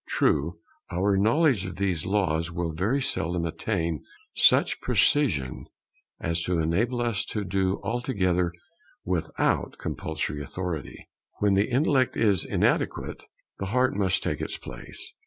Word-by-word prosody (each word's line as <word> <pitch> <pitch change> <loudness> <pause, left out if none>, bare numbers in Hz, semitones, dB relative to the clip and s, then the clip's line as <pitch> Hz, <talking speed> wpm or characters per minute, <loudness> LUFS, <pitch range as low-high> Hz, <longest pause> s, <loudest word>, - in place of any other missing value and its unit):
True, 80 +4 +1 0.3
our 95 +3 +2
knowledge 115 - +3
of 95 - -5
these 90 -5 -1
laws 85 -5 +1
will 85 -1 -2
very 110 - 0
seldom 85 -6 -1
attain 85 -3 -2 0.3
such - - +4
precision 80 - +1 0.5
as 80 0 -1
to 90 +1 0
enable 105 +10 +1
us 115 -4 0
to 105 - -3
do 95 0 0
altogether 95 -8 0 0.5
without 90 -3 0
compulsory 80 -2 -3
authority. 85 +2 -5 0.3
When 105 -1 +2
the 100 +2 +2
intellect 130 0 +2
is 105 -5 +4
inadequate, - - 0 0.3
the 100 - -3
heart 125 +5 +2
must 95 -2 +1
take - - -2
its - - -3
place. 475 - -10
95 Hz, 130 wpm, -26 LUFS, 85-110 Hz, 0.5 s, such